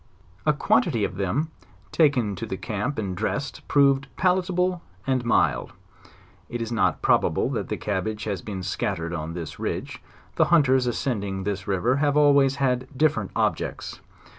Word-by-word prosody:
A 150 - +5
quantity 125 -6 +2
of 90 - -2
them 125 - -1 0.4
taken 130 -10 +2
to 115 - -5
the 95 - -4
camp 110 +9 -3
and 100 -4 -2
dressed, 140 +8 -3
proved 140 -1 +3
palitable 180 -1 +1 0.2
and 130 -2 +1
mild. 120 - +1 0.8
It 120 - -4
is 115 0 -4
not 115 - +1
probable - - +2
that - - -3
cabbage 105 +2 -2
has 100 -5 -3
been 95 -3 -6
scattered 90 -2 -2
on 80 0 -4
this 85 -4 -6
ridge; - - -4 0.4
the - - +5
hunters 130 -7 +4
ascend 120 -3 -1
ing 95 -1 -4
this 100 -1 -3
river 105 +7 +1
have 145 0 +2
always 140 -2 +5
had 130 -2 0
different 140 -10 +2
objects. - - -2
120 Hz, 155 wpm, -25 LUFS, 100-140 Hz, 0.8 s, A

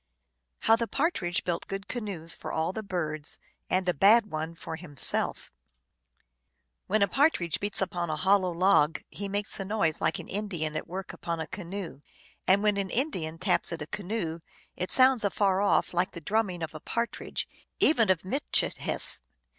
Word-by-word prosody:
How 225 - +5
the 230 0 -2
Partridge 210 - 0
built 175 -2 -2
Good 195 0 -5
Canoes 195 -9 -3
for - - -5
all 160 +3 -1
the 220 - -3
Birds, 155 -7 0 0.3
and 185 0 +1
a 180 - +3
Bad 210 +7 +5
One 160 +2 -3
for 165 - -6
Himself. 160 -4 -1 1.4
When 215 +1 +3
a - - +3
partridge 185 - +2
beats 205 -1 0
upon 175 -2 -3
a 155 - 0
hollow 190 +3 +3
log 170 -3 +3
he 200 - -5
makes 205 +1 -3
a - - -1
noise 190 -6 0
like - - +2
an - - -8
Indian 180 -7 -3
at 155 - -3
work 185 +2 -6
upon 170 -1 -4
a 160 - -2
canoe, 185 -4 -6 0.5
and 195 +2 +5
when 210 -1 +3
an 195 -1 -1
Indian 180 - -1
taps 175 +1 +2
at 165 -3 -4
a - - -7
canoe 180 -2 -3 0.4
it 180 - -3
sounds 255 -3 +5
afar 195 -1 +2
off 205 - +2
like 175 +1 +1
the 170 - -6
drumming 185 0 -1
of 160 - -4
a 155 - -7
partridge, 235 +8 -2 0.3
even 230 -9 +4
of 185 -2 +2
Mitchi 275 +10 +2
hess. - - -1
185 Hz, 180 wpm, -28 LUFS, 165-205 Hz, 1.4 s, How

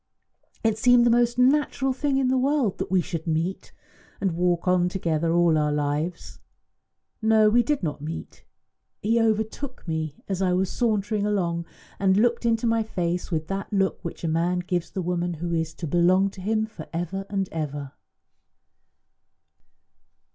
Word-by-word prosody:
It 220 -1 +1
seemed 245 +1 +5
the 240 - +4
most 240 0 +2
natural 270 0 +2
thing 275 +1 0
in 270 -1 +2
the 260 - +2
world 270 -6 +1
that - - -3
we 185 0 +3
should 165 0 -5
meet, 165 +4 -2 0.5
and 195 - 0
walk 175 +1 0
on 180 -1 +3
together 170 -3 -1
all 170 -2 +3
our 150 0 +1
lives. 150 +4 -2 0.8
No, 220 -1 +4
we 240 +2 +5
did 270 0 -1
not 150 -3 -3
meet; 160 +2 -7 0.6
he 230 +2 +2
overtook 220 +3 -2
me 160 -2 -2
as 195 -1 -2
I 185 -1 +2
was 185 +1 0
sauntering 215 -3 0
along, 170 -5 -1 0.3
and 195 -1 +3
looked 235 +2 +2
into 225 0 +1
my 230 0 +2
face 180 -5 -2
with 160 -3 -1
that 195 0 -4
look 195 -2 0
which 170 - -7
a - - 0
man 170 +3 +1
gives 175 -1 -2
the 190 - -4
woman 175 0 -1
who 170 +2 -3
is 160 -1 -1
to 170 - -5
belong 180 +5 +3
to 190 - -11
him 215 +3 0
for 195 -8 -10
ever 175 +4 -4
and 195 -2 -1
ever." 145 -3 -4
185 Hz, 170 wpm, -25 LUFS, 170-220 Hz, 0.8 s, seemed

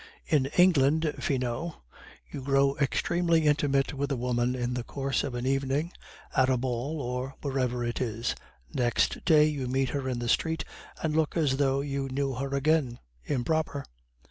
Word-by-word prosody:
"In 140 -4 +2
England, 160 -3 +4
Finot, 130 +4 -2 0.6
you - - -5
grow 135 +1 +2
extremely 165 +3 +1
intimate 145 -2 +2
with 140 0 -2
a - - +1
woman 125 0 0
in 125 -1 -2
the 125 -1 -2
course 135 +1 -2
of 135 -3 -4
an 120 +1 -3
evening, 135 +4 0 0.4
at 130 0 +4
a 130 - +3
ball 130 +5 -2
or 125 +1 -3
wherever 130 -3 -1
it 120 +1 -2
is; 115 -1 -1 0.4
next 120 -2 +1
day 155 -3 +6
you 145 -4 -1
meet 130 +1 +1
her 135 0 -2
in 125 - -2
the 120 0 -3
street 160 +5 +1 0.4
and 155 -1 0
look 160 +1 +1
as 145 -5 +2
though 135 -1 +2
you 140 -1 -3
knew 135 +1 -1
her 135 +2 -3
again 140 -3 +1 0.3
'improper. 145 +1 -1
135 Hz, 170 wpm, -28 LUFS, 125-150 Hz, 0.6 s, day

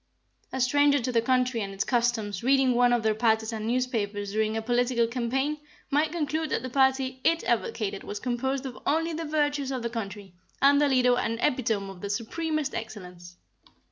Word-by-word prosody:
A 260 - -3
stranger 285 +3 +4
to 250 0 -2
the 230 -1 +2
country 255 -1 +1
and 195 -1 -5
its 195 - 0
customs 230 -6 0
reading 265 0 +3
one 245 0 +4
of 240 -2 +2
their 220 -1 +2
partisan 220 0 0
newspapers 220 -5 -1
during 215 +1 0
a - - -1
political 240 0 +2
campaign, 260 +5 -1 0.3
might 300 +2 +2
conclude 315 -1 -2
that - - -1
the 255 - -5
party 265 -1 +1
it 330 0 +2
advocated 215 - -1
was 205 - -6
composed 260 +3 -2
of 255 -2 -7
only 325 +2 +1
the 325 +1 -4
virtues 290 -2 0
of 255 -3 -3
the 235 - -3
country, 200 -4 -6 0.3
and 285 +1 +5
their 290 - +3
leader 250 -2 +3
an 230 0 -1
epitome 225 -7 0
of 180 -2 -13
the 200 - -4
supremest 300 +7 -2
excellence. 180 -5 -8
245 Hz, 185 wpm, -27 LUFS, 220-275 Hz, 0.3 s, and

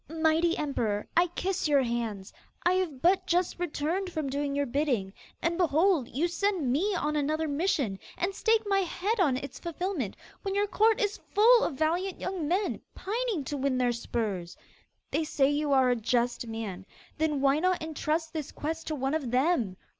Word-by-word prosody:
'Mighty 325 +1 +2
Emperor, 230 -9 -1
I 345 +2 +5
kiss 365 +1 -2
your 285 -2 +4
hands! 230 -5 -3 0.3
I 350 - +5
have 335 -8 -1
but 370 +3 +3
just 350 0 +1
returned 355 +3 -2
from 305 -5 -3
doing 280 0 -1
your 285 0 +1
bidding, 245 -8 0 0.3
and, 335 +1 0
behold, 330 -4 +3
you 305 +8 0
send 350 -6 0
me 380 +10 +1
on 300 -3 -1
another 310 +2 0
mission, 285 - 0 0.2
and 365 +3 -1
stake 445 +2 +2
my 395 -1 +2
head 390 +4 -1
on 285 -9 +3
its 280 +1 -7
fulfilment, 340 - -3 0.3
when 390 -1 -3
your 405 +1 +3
court 435 +4 +3
is 420 -2 0 0.2
full 465 +4 +7
of 295 - -1
valiant 345 +6 0
young 370 -5 -3
men, 380 +5 0
pining 435 - -2
to 290 - -4
win 270 -1 0
their 250 -1 +2
spurs. 215 -7 -3 0.5
They 320 - +1
say 285 -2 +2
you 295 0 0
are 260 -2 +5
a - - +3
just 240 +1 0
man; 215 -4 -5 0.3
then 305 -2 +1
why 275 +2 +3
not 365 0 +1
entrust 315 +1 -2
this 310 -3 -4
quest 320 +2 -4
to 310 - -1
one 270 0 -1
of 300 -6 -1
them? 250 - +1
310 Hz, 185 wpm, -29 LUFS, 265-360 Hz, 0.5 s, full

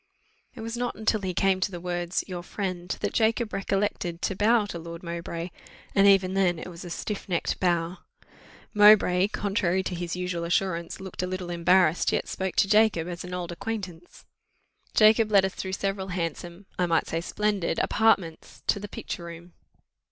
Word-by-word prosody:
It 235 - -8
was 230 +1 -4
not 245 0 -3
till 215 -1 +2
he 190 -1 -2
came 190 0 +2
to 190 - 0
the 175 -2 -7
words 175 0 -2
your 180 -2 -5
friend, 180 -1 -4
that - - -1
Jacob 225 0 +1
recollected 195 -3 -1
to 195 - 0
bow 215 +2 +3
to 175 -4 -6
Lord 170 +1 -8
Mowbray, 170 0 -5 0.4
and 200 0 +5
even 190 -2 +4
then 185 -3 +2
it 160 - -7
was 170 0 -10
a 175 - -7
stiff 200 +4 -5
necked 175 -2 -1
bow. 175 0 0 0.7
Mowbray, 205 -3 +6
contrary 195 -3 0
to 185 - -3
his 175 0 -3
usual 180 -1 -3
assurance, 170 0 -1
looked 190 -2 -6
a 180 - -1
little 185 -1 -4
embarrassed, 175 -1 +3
yet - - -1
spoke 190 -1 -3
to - - +4
Jacob 210 -5 +3
as 175 -1 -5
to - - -7
an 180 - -5
old 175 -1 -4
acquaintance. 180 -3 -6 0.7
Jacob 215 0 +5
led 195 -2 +5
us 190 - -3
through 190 0 -5
several 195 0 -2
handsome, 175 +1 -4
I 180 - +2
might 165 -1 +2
say 165 - -2
splendid, 205 -2 -1
apartments, 195 -7 +1
to - - +2
the 205 - -6
picture 170 - -6
room. 170 +1 -10
185 Hz, 185 wpm, -26 LUFS, 175-200 Hz, 0.7 s, Mowbray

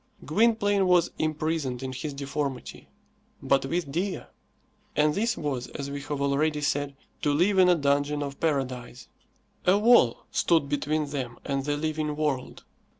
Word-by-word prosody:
Gwynplaine 205 - +2
was 175 -1 +4
imprisoned 155 -4 -1
in 130 -1 -4
his 145 +2 -5
deformity, 140 -2 -4 0.5
but 135 0 +1
with 165 -1 -2
Dea. 185 +6 -2 0.7
And 150 0 +3
this 225 +5 0
was, 135 -5 -3
as 140 0 -6
we 140 0 -4
have 145 0 -4
already 150 +2 +1
said, 145 -1 -1 0.3
to 145 - +2
live 185 +7 +3
in 180 -1 +6
a 180 - +6
dungeon 145 0 +1
of 140 -1 -6
paradise. 130 -6 -2 0.6
A 185 +2 +6
wall 210 - +4
stood 165 -4 +2
between 150 +2 0
them 125 -4 -4
and 135 -1 -2
the 145 0 0
living 155 -1 -2
world. 145 -4 -2
145 Hz, 150 wpm, -27 LUFS, 140-165 Hz, 0.7 s, in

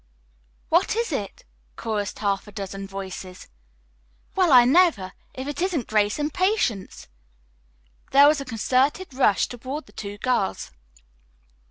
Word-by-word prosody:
"What 345 +5 +2
is 465 +1 -1
it?" - - -5 0.3
chorused 210 -3 -3
half 200 -1 -1
a - - -11
dozen 195 -1 -6
voices. 190 -1 -8 0.9
"Well, 365 -4 +2
I 245 -2 +8
never! 265 - +3 0.2
If 260 +1 -6
it 290 +4 -4
isn't 350 - 0
Grace 210 -1 +1
and 295 0 -2
Patience!" 250 - -1 1.0
There 280 +1 +7
was 300 -1 +3
a - - -6
concerted 260 - 0
rush 255 -7 +3
toward 260 +5 -6
the - - -19
two 205 -1 -7
girls. 240 - -1
250 Hz, 135 wpm, -24 LUFS, 200-300 Hz, 1.0 s, I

